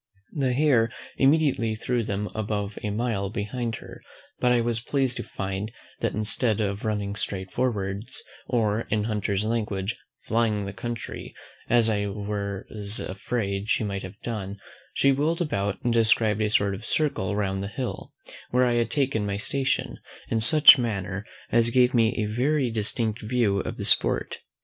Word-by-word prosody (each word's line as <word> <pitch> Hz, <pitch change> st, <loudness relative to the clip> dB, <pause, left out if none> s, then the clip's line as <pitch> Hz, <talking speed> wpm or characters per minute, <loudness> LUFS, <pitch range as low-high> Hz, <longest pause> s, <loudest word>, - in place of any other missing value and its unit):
The 135 Hz, -4 st, 0 dB
hare 125 Hz, -5 st, +3 dB, 0.3 s
immediately 135 Hz, -6 st, +3 dB
threw 120 Hz, +2 st, -1 dB
them 105 Hz, -1 st, -2 dB
above 105 Hz, -1 st, -3 dB
a 105 Hz, -, -2 dB
mile 105 Hz, -2 st, -1 dB
behind 115 Hz, +2 st, -3 dB
her; -, -, -11 dB, 0.4 s
but 125 Hz, -, +3 dB
I 120 Hz, -, +4 dB
was 115 Hz, -1 st, 0 dB
pleased 130 Hz, +1 st, 0 dB
to 120 Hz, -, -3 dB
find, 100 Hz, +2 st, -4 dB, 0.3 s
that -, -, -1 dB
instead 110 Hz, +1 st, +1 dB
of 100 Hz, -1 st, -2 dB
running 105 Hz, -2 st, -1 dB
straight 95 Hz, -3 st, -3 dB
forwards, 105 Hz, -1 st, -1 dB, 0.2 s
or, 110 Hz, -2 st, 0 dB
in 105 Hz, 0 st, +1 dB
hunter's 105 Hz, -2 st, -1 dB
language, 105 Hz, -3 st, -1 dB, 0.3 s
FLYING 110 Hz, -2 st, +1 dB
THE 100 Hz, -, -5 dB
COUNTRY, 115 Hz, +4 st, -6 dB, 0.3 s
as 120 Hz, -1 st, +4 dB
I 105 Hz, -2 st, +1 dB
was 100 Hz, 0 st, -2 dB
afraid 100 Hz, +1 st, -3 dB
she -, -, +2 dB
might 100 Hz, -2 st, -3 dB
have 95 Hz, +3 st, -9 dB
done, 100 Hz, -4 st, -4 dB, 0.4 s
she 140 Hz, -, +4 dB
wheel'd 150 Hz, +5 st, +1 dB
about, 100 Hz, -, -1 dB
and 120 Hz, -1 st, +1 dB
described 110 Hz, -2 st, +3 dB
a 105 Hz, -, +2 dB
sort 100 Hz, -2 st, +2 dB
of 100 Hz, +3 st, -7 dB
circle 115 Hz, -9 st, 0 dB
round 95 Hz, -2 st, -1 dB
the 100 Hz, -, -3 dB
hill 125 Hz, +5 st, -5 dB, 0.4 s
where 125 Hz, +1 st, +3 dB
I 120 Hz, -, +2 dB
had 115 Hz, -, -1 dB
taken 135 Hz, -7 st, +1 dB
my 100 Hz, 0 st, -1 dB
station, 135 Hz, +6 st, -1 dB, 0.3 s
in 115 Hz, -, +1 dB
such 150 Hz, +2 st, +9 dB
manner 100 Hz, -3 st, -3 dB, 0.2 s
as 115 Hz, 0 st, +4 dB
gave 125 Hz, +1 st, +4 dB
me 115 Hz, -1 st, +3 dB
a 110 Hz, -, +1 dB
very 135 Hz, 0 st, +1 dB
distinct 110 Hz, 0 st, -1 dB
view 105 Hz, -3 st, +1 dB
of -, -, -4 dB
the -, -, -4 dB
sport. -, -, +1 dB
110 Hz, 165 wpm, -26 LUFS, 100-120 Hz, 0.4 s, such